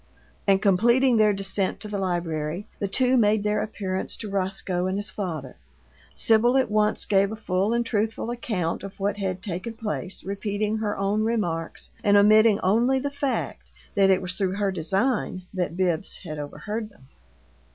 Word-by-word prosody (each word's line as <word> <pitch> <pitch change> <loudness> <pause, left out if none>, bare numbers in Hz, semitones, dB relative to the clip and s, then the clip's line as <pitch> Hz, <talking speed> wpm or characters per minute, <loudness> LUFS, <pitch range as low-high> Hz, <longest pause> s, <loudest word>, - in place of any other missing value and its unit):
And 195 0 +3
completing 235 +6 +4
their 215 -1 +5
descent 195 -1 0
to 215 - -4
the 205 -1 -3
library, 170 -1 -2
the 200 - -1
two 255 +5 +2
made 210 -2 +3
their 210 0 +1
appearance 190 -3 -3
to 210 -3 -6
Roscoe 185 -2 -1
and 190 +1 -1
his 205 0 -3
father. 160 -10 -5 0.6
Sibyl 235 +3 +4
at 260 -5 +1
once 210 0 +2
gave 200 0 +3
a - - -4
full 195 -1 0
and 235 0 +1
truthful 225 +1 -1
account 210 -8 -2
of 195 +2 -9
what 200 +1 -1
had 185 -2 -3
taken 195 +4 -4
place, 210 -4 -4
repeating 205 +2 -2
her 215 -1 -2
own 200 +2 0
remarks, 190 -8 -2
and 205 0 +5
omitting 215 +1 +6
only 235 +8 +3
the 280 +2 -2
fact 280 -1 -3 0.2
that 195 -1 +4
it 190 0 +3
was 180 0 -3
through 190 -1 -1
her 200 -1 0
design 190 +3 -1
that 180 -2 -2
Bibbs 180 -1 0
had 155 -4 -6
overheard 210 +10 -5
them. 170 -11 -21
200 Hz, 170 wpm, -25 LUFS, 185-220 Hz, 0.6 s, omitting